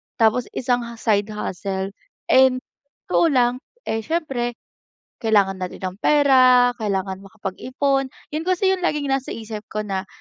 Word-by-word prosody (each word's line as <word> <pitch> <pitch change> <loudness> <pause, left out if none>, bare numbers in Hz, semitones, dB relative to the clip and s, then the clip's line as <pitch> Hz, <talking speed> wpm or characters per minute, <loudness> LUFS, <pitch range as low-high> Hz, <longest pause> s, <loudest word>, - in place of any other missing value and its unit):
tapos 230 +1 +2
isang 245 -1 +1
ha 235 - -8
side 210 -3 +1
hustle. 195 -2 -4 0.4
And 260 -1 +5 0.5
totoo 340 - +4
lang, 250 -5 +3 0.3
eh, 225 - -2
siyempre 245 -3 -2 0.6
kailangan 200 -4 +2
na 185 - -2
rin 180 - -12
ng 185 +1 -4
pera, 255 -4 +5
kailangan 195 -3 -2
makapag-ipon, 255 +8 -2 0.2
'yun 305 +2 -2
kasi 370 +1 +2
yung 380 - 0
laging 295 -5 0
nasa 270 -1 -1
isip 220 -2 -7
ko 215 0 -3
na, 195 -2 -3
235 Hz, 145 wpm, -22 LUFS, 200-270 Hz, 0.6 s, And